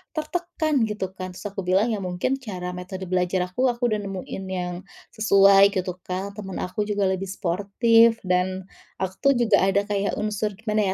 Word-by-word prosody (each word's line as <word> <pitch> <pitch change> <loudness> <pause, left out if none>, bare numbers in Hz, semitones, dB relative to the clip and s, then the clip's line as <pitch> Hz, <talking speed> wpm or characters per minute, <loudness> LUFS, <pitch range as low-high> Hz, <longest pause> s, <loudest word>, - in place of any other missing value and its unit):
tertekan?" 310 -5 -1
gitu 210 -3 -4
kan. 185 -1 -7
Terus - - -10
aku 195 -2 -6
bilang, 195 +6 +3
"Ya 215 - -1
mungkin 185 +8 -2
cara 185 -8 -5
metode 180 +1 -7
belajar 180 0 +1
aku, 255 +8 +1
aku 240 -1 0
udah 215 - +1
nemuin 195 -1 -6
yang 180 -1 -3 0.4
sesuai," 200 -1 +5
gitu, 185 -1 -3
Kak, 195 +3 -5
"teman 190 -3 -5
aku 195 +3 -3
juga 205 -1 0
lebih 190 +1 -3
sportif." 215 +5 +3
Dan 185 0 0 0.4
aku 190 0 -2 0.2
tuh - - +4
juga 230 -4 +3
ada 200 +1 +2
kayak 200 -1 -1
unsur 210 -1 -2
gimana 215 -1 0
200 Hz, 175 wpm, -24 LUFS, 185-215 Hz, 0.4 s, sesuai